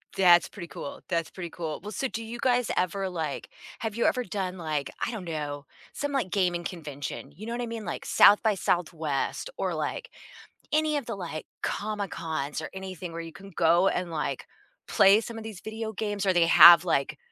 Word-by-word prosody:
That's 175 -3 +6
pretty 175 -4 -9
cool, 280 +9 -8
that's 165 -2 -1
pretty 175 -3 -6
cool. 160 -3 -5
Well, 210 +2 -7
so, 265 +6 -2
do 230 -2 -5
you 230 +2 -7
guys 250 -2 +2
ever, 190 +1 0
like 160 -5 -4 0.3
have 220 -2 -3
you 235 - +1
ever 250 - +2
done, 190 -2 -4
like, 155 -5 -3
I - - -3
don't 220 -6 -6
know, 145 -3 -4 0.3
some, 285 0 -3
like, 270 -9 -1
gaming 175 -3 +1
convention, 145 -5 -6
you 215 +5 -9
know 235 - -3
what 245 - -3
I - - -1
mean? 230 -3 -6
Like, 170 - -5
SXSW 175 - +2
or, - - -1
like, 480 0 -3 0.6
any 310 0 +2
of 280 - -4
the, 230 - -4
like, 170 -5 -6 0.2
Comic 205 -2 -3
Cons, 155 -2 -3
or 155 - -6
anything 185 -2 -7
where 165 0 -5
you 165 -1 -9
can 195 +1 -12
go, 170 +3 +4
and, 180 -1 -2
like, 150 -4 -3 0.4
play 195 +2 +6
some 230 0 -7
of 225 - -7
these 220 -4 -8
video 220 0 -5
games, 205 -1 -2
or 190 - +4
they 175 -1 +4
have, 170 +1 +9
like, 150 -3 0
185 Hz, 200 wpm, -27 LUFS, 165-220 Hz, 0.6 s, have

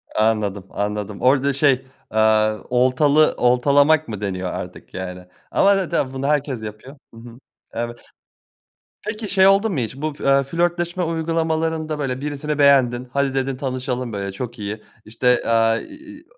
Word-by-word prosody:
Anladım, 105 -3 0
anladım. 105 0 -4
Orada 135 +2 +3
şey, 135 -1 +2 0.3
eee, 110 0 +3
oltalı 130 +5 +3
oltalamak 140 +5 +3
mı 105 -2 -6
deniyor 95 -2 -3
artık - - -8
yani. 90 -1 -6 0.3
Ama 200 0 +4
zaten 155 -8 -1
bunu 135 +1 -3
herkes 145 -5 0
yapıyor. 110 +7 -9 0.2
Hı - - -14
hı, 115 +1 -12 0.3
eve 120 0 -3 1.1
Peki 215 0 -4
şey 190 -1 +4
oldu 200 +3 +4
mu 165 - -2
hiç? 125 +1 -3
Bu 155 +2 -3
f - - -9
eee, 140 0 +4
flörtleşme 175 +4 -1
uygulamalarında, 160 -1 -1
böyle, 130 -2 -3
birisini 150 +1 -3
beğendin, 130 -3 +4
"hadi" 140 -1 0
dedin, 135 0 -1
"tanışalım", 130 -2 -3
böyle, 100 -1 -4
çok 120 +3 -6
iyi. 105 +1 -5 0.2
İşte, 120 +3 +1
eee, 115 0 +2
iii, 305 +1 -13
130 Hz, 150 wpm, -21 LUFS, 115-155 Hz, 1.1 s, Ama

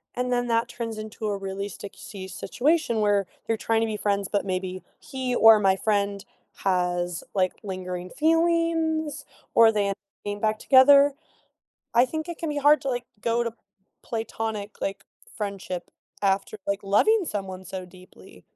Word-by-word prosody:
and 250 0 -1
then 245 0 0
that 230 0 +1
turns 230 -2 -5
into 215 0 -5
a 200 -1 -1
really 195 +1 -4
sticky 195 0 -9
situation, 265 - 0
where 205 -3 +2 0.2
you're 225 -1 +1
trying 225 0 +2
to 225 - +1
be - - -3
friends, 200 -1 0
but 205 -1 0
maybe 185 -1 -3 0.2
he 260 -2 -3
or 225 -1 +8
my 195 -2 +4
friend 200 -1 0 0.4
has, 180 -2 0
like, 185 -1 +2
lingering 180 -2 -5
feelings 325 0 +1 0.3
or 225 -1 +7
they 210 -2 +1
end 200 - 0
up 195 - -5 0.3
getting 205 0 -3
back 215 0 +1
together. 280 +1 +7 0.8
I 240 +2 +6
think 315 +4 -4
it 345 - -5
can 325 - -3
be 295 - -2
hard 295 +2 +5
to, 275 - -3
like, 245 -1 -2 0.2
go 235 +1 +1
to 230 -1 -3 0.5
platonic, 220 -2 -4
like, 195 - -3 0.3
friendship 195 -4 -5 0.3
after, 195 +2 +1
like, 200 0 0
loving 385 - +4
someone 190 -4 -5
so 185 +1 -6
deeply. 185 0 -16
215 Hz, 165 wpm, -25 LUFS, 195-250 Hz, 0.8 s, or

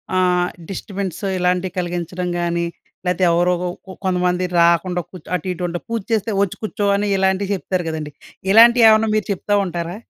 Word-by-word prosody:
అహ్, 180 -1 +2 0.2
డిస్టర్బెన్స్ 195 -2 -5 0.2
ఇలాంటివి 180 0 0
కలిగించడం 175 0 -3
గాని, 170 0 -1 0.4
లెతే 180 +1 0
ఎవరోగొ 175 +1 +1 0.4
కొంతమంది 180 -1 +1
రాకుండా 170 +1 +3
కూర్చ్ 180 -4 -13
అటు 180 +2 -4
ఇటు 180 0 -5
ఉంటా 175 0 -4
పూజ 230 -1 -1
చేస్తే 220 0 0
వచ్చి 200 -3 0
కూర్చో 205 -1 -2
అని 205 +1 0
ఇలాంటివి 190 +1 +1
చెప్తారు 185 -1 -2
కదండీ. 155 -2 -5 0.4
ఇలాంటివి 235 +2 +7
ఏమన్నా 220 0 +4
మీరు 215 -3 0
చెప్తా 205 +2 -2
ఉంటారా? 175 0 -4
180 Hz, 155 wpm, -20 LUFS, 175-195 Hz, 0.4 s, ఇలాంటివి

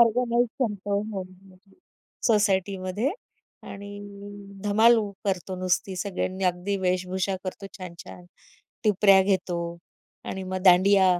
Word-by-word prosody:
Organise 235 +1 +4
करतो 205 -4 0
हो 195 - -3 1.0
सोसायटीमध्ये 200 +1 +1 0.6
आणि 205 +1 -8 0.7
धमाल 225 +3 +5 0.3
करतो 185 -1 -2
नुसती. 185 +1 0
सगळ्यांनी 190 0 -2
अगदी 180 +2 0
वेशभूषा 185 +1 0
करतो 190 +1 -5
छान-छान. 180 0 -10 0.6
टिपऱ्या 195 -2 +6
घेतो 185 -2 0 0.7
आणि 190 - -4
मग 185 0 -4
दांडिया 190 +1 +6
195 Hz, 95 wpm, -26 LUFS, 185-205 Hz, 1.0 s, टिपऱ्या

